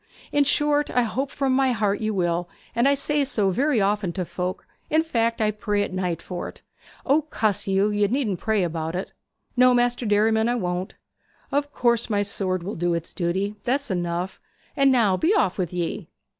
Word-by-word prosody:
In 290 Hz, -1 st, +3 dB
short, 295 Hz, +1 st, +2 dB
I 245 Hz, -, +2 dB
hope 260 Hz, +5 st, -2 dB
from 275 Hz, -2 st, 0 dB
my 265 Hz, -1 st, +3 dB
heart 210 Hz, -2 st, 0 dB
you 215 Hz, 0 st, 0 dB
will 175 Hz, -3 st, 0 dB
be, -, -, -33 dB, 0.2 s
and 235 Hz, +3 st, +3 dB
I 280 Hz, -, +4 dB
say 290 Hz, +1 st, +1 dB
so 210 Hz, -8 st, +1 dB
very 270 Hz, +5 st, +2 dB
often 200 Hz, -2 st, +1 dB
to 185 Hz, -1 st, -3 dB
folk 180 Hz, +2 st, -4 dB, 0.2 s
in 315 Hz, +1 st, +3 dB
fact, 230 Hz, -7 st, 0 dB
I 215 Hz, -1 st, +2 dB
pray 210 Hz, -1 st, -1 dB
at 185 Hz, -, -5 dB
night 180 Hz, -3 st, -2 dB
for't.' 180 Hz, -2 st, -7 dB, 0.4 s
'O! 285 Hz, +3 st, +4 dB
cuss 215 Hz, -11 st, -1 dB
you! 195 Hz, +2 st, +2 dB
you 205 Hz, 0 st, +2 dB
needn't 220 Hz, -6 st, -1 dB
pray 220 Hz, -3 st, +1 dB
about 165 Hz, -1 st, -3 dB
it.' 185 Hz, -, -4 dB, 0.4 s
'No, 250 Hz, 0 st, +6 dB
Maister 245 Hz, -1 st, +1 dB
Derriman, 220 Hz, +2 st, +3 dB
I 240 Hz, -, +1 dB
won't.' 180 Hz, -4 st, -3 dB, 0.6 s
'Of 285 Hz, +1 st, 0 dB
course 235 Hz, -3 st, +1 dB
my 205 Hz, -2 st, +1 dB
sword 185 Hz, -3 st, -1 dB
will 200 Hz, +4 st, -4 dB
do 175 Hz, 0 st, 0 dB
its 170 Hz, 0 st, -5 dB
duty. 190 Hz, +4 st, -1 dB
That's 270 Hz, -1 st, -1 dB
enough. 175 Hz, +1 st, -2 dB, 0.3 s
And 275 Hz, -1 st, +4 dB
now 215 Hz, -7 st, +3 dB
be 350 Hz, -, +2 dB
off 195 Hz, -, +1 dB
with 180 Hz, -3 st, -1 dB
ye.' 175 Hz, -2 st, -3 dB
210 Hz, 200 wpm, -24 LUFS, 185-255 Hz, 0.6 s, No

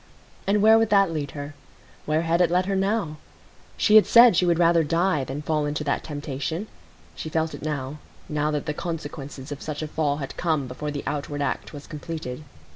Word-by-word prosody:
And 205 Hz, +1 st, +3 dB
where 220 Hz, +1 st, +7 dB
would 225 Hz, -1 st, +2 dB
that 195 Hz, -3 st, +4 dB
lead 150 Hz, -3 st, -3 dB
her? 145 Hz, +1 st, -6 dB, 0.5 s
Where 155 Hz, +2 st, +1 dB
had 170 Hz, +1 st, +2 dB
it 175 Hz, -, +4 dB
led 180 Hz, +1 st, +2 dB
her 195 Hz, +1 st, -1 dB
now? 195 Hz, -5 st, 0 dB, 0.6 s
She 215 Hz, 0 st, +6 dB
had 215 Hz, -, +6 dB
said 235 Hz, -3 st, +8 dB
she 180 Hz, +1 st, +3 dB
would 170 Hz, -1 st, +3 dB
rather 170 Hz, -1 st, +4 dB
die 165 Hz, -1 st, +1 dB
than 135 Hz, +3 st, -5 dB
fall 150 Hz, -1 st, 0 dB
into 150 Hz, +1 st, -2 dB
that 145 Hz, -, -1 dB
temptation. 145 Hz, +4 st, -4 dB, 0.5 s
She 155 Hz, -, -6 dB
felt 160 Hz, 0 st, -1 dB
it -, -, -8 dB
now,—now 150 Hz, +1 st, -4 dB
that 150 Hz, -2 st, -2 dB
the 150 Hz, -, -2 dB
consequences 145 Hz, -4 st, -6 dB
of 145 Hz, -, -6 dB
such 155 Hz, 0 st, -4 dB
a -, -, -3 dB
fall 150 Hz, -2 st, 0 dB
had 135 Hz, -3 st, -6 dB
come 155 Hz, -5 st, 0 dB
before 130 Hz, +4 st, -5 dB
the 145 Hz, -1 st, -4 dB
outward 145 Hz, 0 st, -3 dB
act -, -, -3 dB
was 145 Hz, -1 st, -9 dB
completed. 155 Hz, -3 st, -6 dB
155 Hz, 200 wpm, -25 LUFS, 145-175 Hz, 0.6 s, said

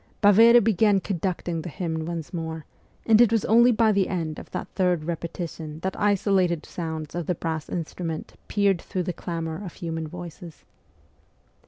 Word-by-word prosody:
Baveri 225 Hz, +4 st, +8 dB
began 210 Hz, -2 st, +3 dB
conduct 185 Hz, -2 st, -3 dB
ing 165 Hz, -2 st, -1 dB
the 175 Hz, -, -6 dB
hymn 160 Hz, -1 st, -3 dB
once 170 Hz, 0 st, -5 dB
more, 160 Hz, -2 st, -4 dB, 0.4 s
and 225 Hz, 0 st, +6 dB
it 235 Hz, -2 st, +5 dB
was 225 Hz, -3 st, +2 dB
only 235 Hz, +3 st, +6 dB
by 225 Hz, -1 st, +3 dB
the 200 Hz, -2 st, +2 dB
end 165 Hz, -5 st, -3 dB
of -, -, -11 dB
that -, -, -5 dB
third 180 Hz, -4 st, +1 dB
repetition 165 Hz, -1 st, -5 dB
that 190 Hz, +1 st, -2 dB
isolated 190 Hz, -5 st, +1 dB
sounds 160 Hz, -3 st, -5 dB
of 175 Hz, -2 st, -4 dB
the 180 Hz, -, 0 dB
brass 160 Hz, -1 st, -4 dB
instruments 165 Hz, -1 st, -4 dB
pierced 200 Hz, -4 st, +2 dB
through 185 Hz, -, -3 dB
the 180 Hz, 0 st, -3 dB
clamour 165 Hz, +1 st, -4 dB
of 180 Hz, -, -7 dB
human 165 Hz, -3 st, -4 dB
voices. 170 Hz, -1 st, -10 dB
175 Hz, 170 wpm, -25 LUFS, 160-200 Hz, 0.4 s, Baveri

